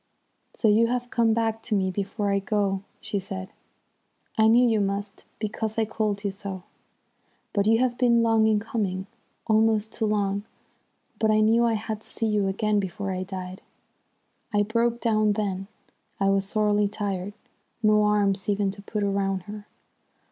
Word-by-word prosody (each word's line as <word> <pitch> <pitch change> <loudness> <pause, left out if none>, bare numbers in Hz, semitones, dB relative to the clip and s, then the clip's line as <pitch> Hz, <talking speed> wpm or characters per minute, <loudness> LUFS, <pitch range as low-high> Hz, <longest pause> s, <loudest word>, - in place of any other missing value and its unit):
"'So 225 - +1
you 220 +2 +5
have 245 0 -2
come 230 -1 +3
back 225 0 0
to 225 -1 -2
me 190 -1 +1
before 200 +2 -2
I 200 - +2
go,' 195 -1 0 0.2
she 200 - -2
said. 190 0 -6 0.9
'I 220 0 +4
knew 240 +2 +6
you 220 -2 +2
must, 200 0 -3
because 220 0 -3
I 225 - +2
called 210 -2 -2
you 200 - -1
so. 190 -2 -7 0.9
But 200 0 +1
you 225 +1 +5
have 245 0 0
been 235 -2 +4
long 225 -1 +4
in 215 -1 +3
coming, 200 -4 -2 0.4
almost 220 -1 +2
too 220 - -1
long. 200 -1 0 0.8
But 220 - +2
I 215 0 +4
knew 225 +2 +4
I 230 -1 +2
had 215 0 -4
to - - -12
see 225 - -2
you 210 -2 +1
again 210 +2 +1
before 195 +1 -3
I 185 0 -3
died.' 185 -1 -6 0.9
"I 205 -1 +3
broke 235 +2 0
down 215 -2 +2
then. 195 -2 -2 0.5
I 195 0 +3
was 195 0 0
sorely 210 -1 +2
tried. 200 -1 -3 0.5
No 215 0 +5
arms 205 -2 +1
even 200 -1 +1
to 200 +1 -9
put 205 +1 -3
round 195 -2 0
her! 205 +1 -9
210 Hz, 170 wpm, -26 LUFS, 195-220 Hz, 0.9 s, knew